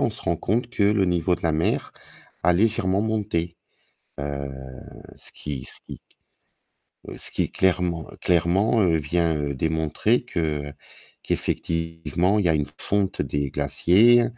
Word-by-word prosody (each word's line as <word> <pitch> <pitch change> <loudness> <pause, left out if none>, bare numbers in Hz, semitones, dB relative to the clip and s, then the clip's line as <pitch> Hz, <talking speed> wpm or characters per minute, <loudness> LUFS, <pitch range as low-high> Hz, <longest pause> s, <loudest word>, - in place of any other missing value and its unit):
on - - +2
se - - -8
rend 85 - 0
compte 115 +8 -1
que 110 - -1
le 100 -1 +4
niveau 90 0 +1
de 90 - -16
la 80 - +2
mer 80 +2 0 0.5
a 90 - +4
légèrement 100 0 +2
monté. 105 -6 -1 0.6
Heu, 70 -1 -4 0.7
ce - - -10
qui 70 -4 -6
ce - - -9
qui, - - -9 1.1
heu, - - -7
ce - - -8
qui - - -1
clairement 90 -3 +1
clairement, 90 +6 +2
heu, 85 -4 +3
vient, 80 +2 +1
heu, 70 -1 -2
démontrer 80 - 0
que 90 -8 -2 0.8
qu'effectivement 80 +4 -1
il 100 - 0
y - - +4
a 80 - +4
une 75 -1 0 0.2
fonte 100 -2 +1
des 70 -2 -2
glaciers, 95 +11 +4
85 Hz, 150 wpm, -24 LUFS, 80-100 Hz, 1.1 s, le